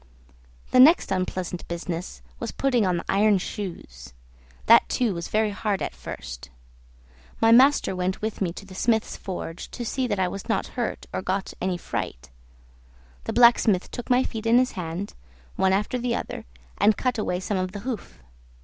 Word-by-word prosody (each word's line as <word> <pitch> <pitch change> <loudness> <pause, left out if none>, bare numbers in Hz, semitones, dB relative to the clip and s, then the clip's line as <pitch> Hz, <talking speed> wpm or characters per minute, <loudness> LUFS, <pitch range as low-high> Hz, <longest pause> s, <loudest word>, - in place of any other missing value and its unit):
The 255 - +5
next 310 +7 +7
unpleasant 185 -1 -2
business 170 +1 -5 0.2
was 230 - -4
putting 245 -7 +1
on 180 -1 +1
the - - -5
iron 205 +1 +4
shoes; 165 - -7 0.5
that 230 +1 +6
too 240 -6 +1
was 170 -1 -5
very 215 0 +1
hard 200 0 -1
at - - -3
first. - - -8 0.9
My 225 - +5
master 260 -3 +5
went 185 +1 -1
with 215 -1 -4
me 180 -3 +1
to 195 - -10
the 190 - -12
smith's 220 +3 0
forge, 175 -3 -6
to 240 - -6
see 260 +2 -1
that 205 -3 -1
I 185 -1 +1
was 195 +5 -7
not 225 - 0
hurt 240 -3 -3
or - - -2
got 190 +1 -2
any 185 -1 0
fright. 65 - -5 0.9
The - - -3
blacksmith 235 -5 +4
took 245 - -7
my 250 +1 +4
feet 225 -3 -4
in 230 +1 +5
his 255 0 +3
hand, 180 +2 -5 0.4
one 190 - +2
after 210 +6 0
the 240 -1 -1
other, - - -5 0.3
and 215 0 +4
cut 250 -3 -1
away 180 -4 -1
some 190 +1 -2
of 185 0 -2
the 205 0 -7
hoof. 230 - -6
200 Hz, 180 wpm, -25 LUFS, 185-235 Hz, 0.9 s, next